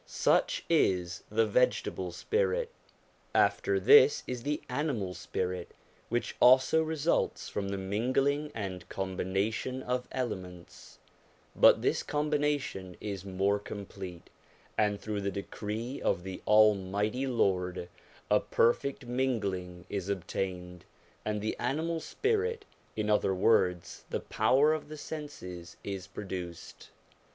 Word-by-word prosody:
Such -, -, +1 dB
is 90 Hz, -2 st, +2 dB
the 110 Hz, +1 st, +3 dB
vegetable 100 Hz, -5 st, +1 dB
spirit. 470 Hz, -, 0 dB, 0.6 s
After 395 Hz, -1 st, +3 dB
this 440 Hz, +2 st, +7 dB
is 125 Hz, -1 st, -4 dB
the 145 Hz, +4 st, -2 dB
animal 125 Hz, -9 st, -2 dB
spirit, 90 Hz, 0 st, -4 dB, 0.3 s
which 120 Hz, +1 st, -1 dB
also 130 Hz, +5 st, +6 dB
results 160 Hz, 0 st, 0 dB
from 100 Hz, -1 st, -3 dB
the 100 Hz, -, -2 dB
mingling 130 Hz, +9 st, 0 dB
and 95 Hz, -4 st, -5 dB
combination 95 Hz, +7 st, -2 dB
of 125 Hz, 0 st, -2 dB
elements; 90 Hz, -9 st, -6 dB, 0.6 s
but -, -, +6 dB
this -, -, +2 dB
combination 145 Hz, -11 st, -1 dB
is 100 Hz, -3 st, -5 dB
more 100 Hz, +1 st, +1 dB
complete, 95 Hz, -4 st, -8 dB, 0.4 s
and 105 Hz, -1 st, +1 dB
through 105 Hz, -1 st, -3 dB
the 100 Hz, -, -1 dB
decree 105 Hz, +6 st, -5 dB
of 85 Hz, -, 0 dB
the 95 Hz, 0 st, -6 dB
Almighty 105 Hz, +3 st, +3 dB
Lord 90 Hz, -7 st, 0 dB, 0.4 s
a -, -, +6 dB
perfect 135 Hz, +3 st, +1 dB
mingling 100 Hz, -8 st, -2 dB
is 100 Hz, -1 st, -4 dB
obtained, 90 Hz, -2 st, -3 dB, 0.4 s
and 105 Hz, -1 st, -2 dB
the 110 Hz, -, -2 dB
animal 160 Hz, +3 st, -1 dB
spirit, 440 Hz, -, -1 dB, 0.3 s
in 110 Hz, -1 st, -1 dB
other 105 Hz, -2 st, +2 dB
words 90 Hz, -3 st, +2 dB
the -, -, -1 dB
power 135 Hz, +8 st, +3 dB
of 155 Hz, -1 st, -4 dB
the 155 Hz, -, -7 dB
senses, 145 Hz, -, -7 dB
is 95 Hz, -2 st, -5 dB
produced. 90 Hz, -3 st, -7 dB
105 Hz, 120 wpm, -30 LUFS, 95-135 Hz, 0.6 s, this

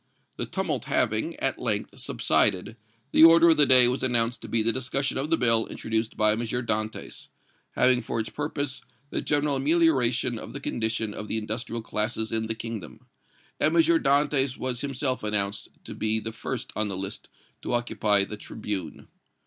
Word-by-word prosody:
The -, -, -3 dB
tumult -, -, -2 dB
having, -, -, 0 dB
at -, -, -2 dB
length, -, -, -2 dB
subsided, 100 Hz, +1 st, +1 dB, 0.4 s
the -, -, +6 dB
order 165 Hz, +1 st, +8 dB
of 160 Hz, -, +3 dB
the 145 Hz, -2 st, +6 dB
day 125 Hz, -2 st, +8 dB
was 125 Hz, +2 st, -1 dB
announced 120 Hz, -1 st, +1 dB
to -, -, -8 dB
be 115 Hz, -1 st, +1 dB
the 115 Hz, -, +2 dB
discussion 130 Hz, +2 st, -2 dB
of 145 Hz, +3 st, -3 dB
the 165 Hz, -, +3 dB
bill 115 Hz, -2 st, +2 dB
introduced 110 Hz, 0 st, -3 dB
by 110 Hz, 0 st, +3 dB
M. 110 Hz, -, -1 dB
Dantès, 110 Hz, -2 st, -3 dB, 0.5 s
having 125 Hz, -1 st, +3 dB
for -, -, -3 dB
its 110 Hz, 0 st, -3 dB
purpose 145 Hz, -2 st, -3 dB, 0.3 s
the -, -, -2 dB
general 145 Hz, -1 st, 0 dB
amelioration 135 Hz, -6 st, +2 dB
of -, -, -9 dB
the 140 Hz, -, -6 dB
condition 110 Hz, -4 st, -2 dB
of 105 Hz, -, -7 dB
the 110 Hz, -, -1 dB
industrial 110 Hz, +1 st, -4 dB
classes 110 Hz, +1 st, -2 dB
in 110 Hz, 0 st, -1 dB
the 110 Hz, -, -2 dB
Kingdom; 110 Hz, -7 st, -7 dB, 0.5 s
and 155 Hz, +2 st, +2 dB
M. -, -, +4 dB, 0.2 s
Dantès 140 Hz, -1 st, +2 dB
was 125 Hz, -2 st, -3 dB
himself 135 Hz, -2 st, -2 dB
announced 100 Hz, -1 st, -1 dB, 0.2 s
to -, -, -8 dB
be 110 Hz, 0 st, 0 dB
the 110 Hz, +1 st, -6 dB
first -, -, -5 dB
on 110 Hz, 0 st, 0 dB
the 95 Hz, -2 st, -3 dB
list 95 Hz, +2 st, -6 dB, 0.3 s
to -, -, -4 dB
occupy 105 Hz, -4 st, +1 dB
the 105 Hz, -, -7 dB
tribune. 100 Hz, -6 st, -6 dB
115 Hz, 180 wpm, -26 LUFS, 110-135 Hz, 0.5 s, order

